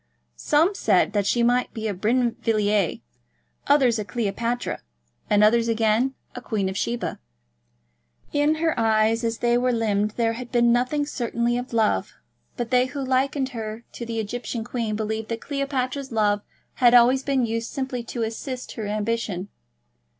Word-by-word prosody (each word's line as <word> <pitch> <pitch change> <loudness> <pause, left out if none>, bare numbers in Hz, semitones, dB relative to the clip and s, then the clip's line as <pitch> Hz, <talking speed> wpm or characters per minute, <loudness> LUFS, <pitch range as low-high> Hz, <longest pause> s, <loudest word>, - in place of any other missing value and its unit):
Some 320 - +2
said 210 - +2
that 205 -2 +1
she 240 +2 +2
might 245 +1 +1
be 220 -1 -3
a 210 - -1
Brinvilliers, 215 -2 +1 0.7
others 260 -6 +4
a - - -1
Cleopatra, 235 +2 -2 0.5
and 210 0 +4
others 230 +2 +4
again 230 +3 +2 0.2
a 250 - -7
Queen 205 -6 -1
of 190 - -5
Sheba. 235 +4 -2 1.1
In 295 +2 +3
her 320 0 +1
eyes 225 +1 +2
as 230 0 -1
they 240 0 +2
were 250 0 +2
limned 215 -2 0
there 230 -1 +2
had 245 +1 -8
been 240 -1 +4
nothing 255 +5 +1
certainly 240 -3 -1
of 245 +1 -4
love, 225 -2 +1 0.4
but 240 -1 -3
they 250 0 +4
who 275 +1 -4
likened 265 +1 +1
her 225 -2 -6
to - - -7
the 230 -1 -3
Egyptian 225 +1 -4
queen 230 -2 -3
believed 220 0 -3
that 230 -1 -3
Cleopatra's 275 -1 -2
love 210 -2 +2 0.4
had 245 -1 +7
always 245 +2 +6
been 270 -2 +1
used 230 0 -3
simply 260 -2 -3
to 235 -1 -3
assist 250 +3 -5
her 220 -3 -5
ambition. 210 -2 -2
235 Hz, 160 wpm, -24 LUFS, 220-255 Hz, 1.1 s, had